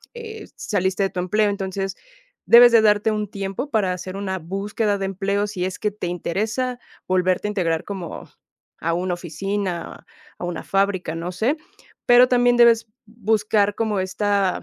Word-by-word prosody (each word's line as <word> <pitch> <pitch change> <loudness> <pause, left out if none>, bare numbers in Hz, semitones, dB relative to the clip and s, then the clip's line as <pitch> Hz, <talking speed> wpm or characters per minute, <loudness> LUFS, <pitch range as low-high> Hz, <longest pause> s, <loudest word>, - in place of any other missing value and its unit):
eh, 445 -2 -8
saliste 190 -1 -1
de 195 - +1
tu 180 - -4
empleo, 210 +3 +1
entonces, 195 -1 -3 0.5
debes 240 +1 +8
de 225 - +7
darte 210 0 +3
un 210 -2 -2
tiempo 195 +7 -4
para 195 -5 +1
hacer 185 +1 -6
una 190 -1 -3
búsqueda 200 +4 -2
de 195 - -3
empleo. 200 +2 -1
Si 190 -3 -4
es 185 0 -5
que 210 -1 0
te 200 -3 -5
interesa 220 +9 -2 0.3
volverte 185 +2 +1
a - - -2
integrar 165 -5 -1
como 190 -5 -7 0.5
a 165 +1 -1
una 180 +1 -1
oficina, 180 +1 -4 0.3
a - - -6
una 175 -2 -4
fábrica. 195 -4 0
No 170 +2 -4
sé, 225 - 0 0.5
pero 245 +1 +7
también 245 -1 +3
debes 230 -1 +5 0.2
buscar 215 -2 +1
como 215 -3 -1
esta, 195 0 0
200 Hz, 165 wpm, -22 LUFS, 185-220 Hz, 0.5 s, debes